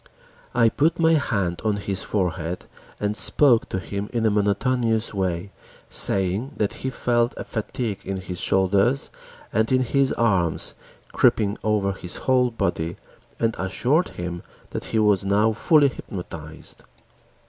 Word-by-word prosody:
I 115 -2 +5
put 155 +8 +1
my 165 -1 +3
hand 100 - 0
on 105 -2 0
his 100 -1 -2
forehead 90 -3 -2 0.3
and 105 0 -1
spoke 125 0 +5
to - - -2
him 100 +2 -5
in 115 -2 -1
a 110 - +3
monotonous 110 +3 0
way, 95 -1 -2 0.4
saying 100 +8 +3
that 105 - 0
he 130 - -2
felt 120 -1 0
a - - -4
fatigue 110 -2 -4
in 95 0 -4
his 90 -1 -7
shoulders, 95 +7 +1 0.4
and 110 +2 +1
in 130 0 +3
his 135 +2 +1
arms, 95 -8 +2 0.4
creeping 105 -2 +2
over 105 -2 +1
his 90 -2 -8
whole 130 -1 +3
body 85 -7 -2 0.4
and 115 -1 0
assured 125 - +1
him 85 0 -5 0.3
that - - -5
he - - -2
was 105 -3 +3
now 105 +3 +2
fully 145 +5 +4
hypnotized. 85 - -9
105 Hz, 145 wpm, -23 LUFS, 95-120 Hz, 0.4 s, I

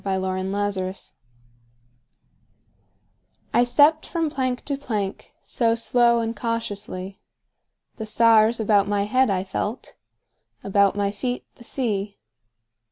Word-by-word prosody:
Part 190 -1 -1
One: 185 0 -2
Life 205 0 0
CXXXVI 185 0 -4 2.4
I 240 - +5
STEPPED 290 +6 +4
from 330 -3 -1
plank 255 -3 -2
to 285 - -1
plankSo 230 0 -2
slow 235 0 +3
and 225 0 -3
cautiously; 205 -4 -4 0.8
The 220 -2 -5
stars 225 +1 +4
about 205 -2 +3
my 205 -1 +1
head 255 +5 +2
I 185 -2 0
felt, 205 +4 -4 0.7
About 200 0 +3
my 200 -1 0
feet 245 +5 -4
the 240 - -16
sea. 210 -6 -3
215 Hz, 115 wpm, -23 LUFS, 200-240 Hz, 2.4 s, I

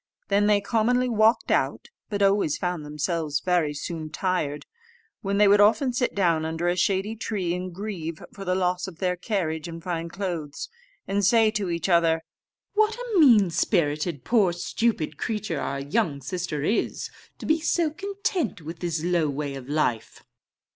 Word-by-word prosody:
Then 205 +1 +3
they 205 -1 +4
commonly 245 +4 +1
walked 220 0 +3
out, - - 0 0.2
but 205 -2 0
always 195 -6 +3
found 180 -3 -2
themselves 150 0 -2
very 175 -4 +1
soon 160 +1 -5
tired; 155 -4 -2 0.6
when 200 0 -1
they 210 0 +6
would 205 +1 +6
often 245 +5 +4
sit 250 +1 0
down 170 -5 +2
under 160 +2 -2
a 175 - +2
shady 195 +4 0
tree, 200 -6 -2
and 180 +1 -4
grieve 170 -4 -5
for 195 - -8
the 185 -1 0
loss 180 0 0
of 180 -4 -9
their 180 -1 0
carriage 175 -5 -2
and 165 0 -8
fine 170 -2 -3
clothes, 170 -6 -4 0.4
and 200 +1 0
say 220 +2 +5
to 205 -4 -2
each 170 0 -2
other, 165 -2 +3 0.5
"What 430 +1 +3
a 480 -5 -1
mean 220 - +6
spirited 155 - 0
poor 205 - +3
stupid 175 -3 -1
creature 210 -8 -2
our 140 - -2
young 145 0 0
sister 155 0 -3
is, 210 +9 -1 0.3
to - - -8
be 315 +1 +2
so 335 -1 +1
content 390 - -2
with 165 +1 -8
this 165 -3 -2
low 170 -3 +1
way 140 0 -3
of 135 -1 -8
life!" 135 -7 -1
180 Hz, 170 wpm, -25 LUFS, 160-210 Hz, 0.6 s, they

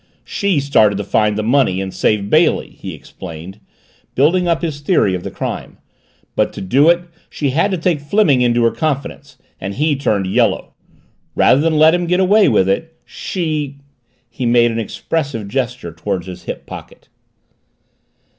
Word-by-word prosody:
"She 200 -6 0
started 110 -7 +3
to 100 - -3
find 105 +1 +1
the 110 - -1
money 115 -5 +2
and 95 -1 -4
save 100 +2 0
Bailey," 155 +9 +2
he - - -8
explained, 90 +3 -10 0.6
building 175 +7 +3
up 170 0 0
his 155 -4 -3
theory 145 - +2
of 90 - -3
the - - -5
crime. - - -5 0.6
"But - - +1
to - - -7
do 135 - +3
it 175 0 +4 0.3
she 145 -3 -2
had 165 +9 +2
to 190 - -1
take 165 -3 0
Fleming 145 -4 +2
into 120 -1 +2
her 115 - +3
confidence 150 -4 -4 0.2
and 95 +1 -5
he 150 +1 +1
turned 105 -8 0
yellow. 95 - 0 0.6
Rather 135 - +4
than 160 0 +1
let 155 +1 +6
him 175 -1 0
get 180 +2 +2
away 200 0 +4
with 105 -6 +3
it, 160 +12 -2
she 155 -6 -3 0.3
" 120 +1 -44
He 125 - -3
made 120 0 +4
an 115 - -3
expressive 130 0 -3
gesture 125 - -3
toward 85 +2 -3
his 90 -1 -9
hip - - -6
pocket. - - -11
135 Hz, 175 wpm, -17 LUFS, 105-160 Hz, 0.6 s, let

